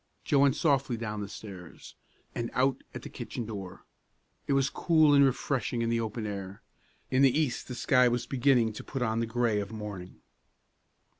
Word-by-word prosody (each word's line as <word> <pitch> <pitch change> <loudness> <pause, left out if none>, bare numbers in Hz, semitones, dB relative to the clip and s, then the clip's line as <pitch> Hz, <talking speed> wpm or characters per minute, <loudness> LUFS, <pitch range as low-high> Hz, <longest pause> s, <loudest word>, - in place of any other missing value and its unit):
Joe 140 - +3
went 140 -1 +4
softly 135 -5 +1
down 105 -2 -4
the 100 - -5
stairs, 95 -5 -10 0.4
and 120 0 -3
out 130 +1 +1
at - - -8
the - - -6
kitchen 120 - -6
door. 100 -4 -8 0.6
It - - +1
was 135 -1 +3
cool 155 -1 +3
and 140 0 +7
refreshing 130 -2 0
in 115 - 0
the 115 0 +1
open 110 0 -3
air. 100 -2 -6 0.5
In 130 +1 +3
the 135 +2 +5
east 145 -6 -1
the 125 - -6
sky 125 0 +4
was 120 0 0
beginning 125 -4 +2
to - - -8
put 135 -3 -3
on 110 -1 0
the 115 - -1
gray 115 -2 +1
of 100 0 -5
morning. 105 -4 -8
120 Hz, 190 wpm, -29 LUFS, 105-135 Hz, 0.6 s, and